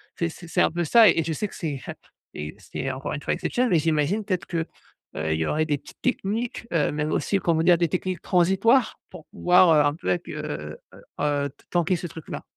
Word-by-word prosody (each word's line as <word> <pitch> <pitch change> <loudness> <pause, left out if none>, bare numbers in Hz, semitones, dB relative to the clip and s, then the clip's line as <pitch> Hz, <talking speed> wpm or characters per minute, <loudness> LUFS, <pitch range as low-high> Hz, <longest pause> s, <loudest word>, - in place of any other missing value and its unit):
C'est 170 - -1
c'est 170 +1 -11
c'est - - +1
un - - +3
peu 175 +1 -1
ça 225 +6 +7
et 165 -1 +2
je 165 - -1
sais 210 +7 -2
que - - -12
c'est 145 -6 -4
hep - - -6 0.4
et 75 +1 -6
c'est 135 - -5
encore 130 +1 -5
une 145 - -4
fois - - -2
exceptionnel, 250 0 0
mais 175 - +5
j'imagine 160 +7 0
peut-être 185 -4 -2
que, 165 -2 -2 0.5
heu, 80 0 -1
il 80 - -1
y 80 - 0
aurait 155 +1 +1
des 145 -2 +1
petites - - -16
techniques, 230 0 -2
heu, 155 -4 +2
même 150 +1 -2
aussi 200 - +1
comment 170 -3 +1
dire? 175 0 +5
Des 170 -2 +2
techniques 185 +1 -2
transitoires 195 +7 +3
pour 160 - -11
pouvoir, 180 0 +4
heu, 150 - +5
un 145 - +2
peu 125 - -5
accu 90 - -3
heu 75 +1 -5 0.2
heu - - -14 0.2
heu, 145 -1 0
t - - -24
tanquer 175 +1 +2
ce 175 - -5
truc-là. 160 -1 -8
165 Hz, 240 wpm, -25 LUFS, 145-185 Hz, 0.5 s, ça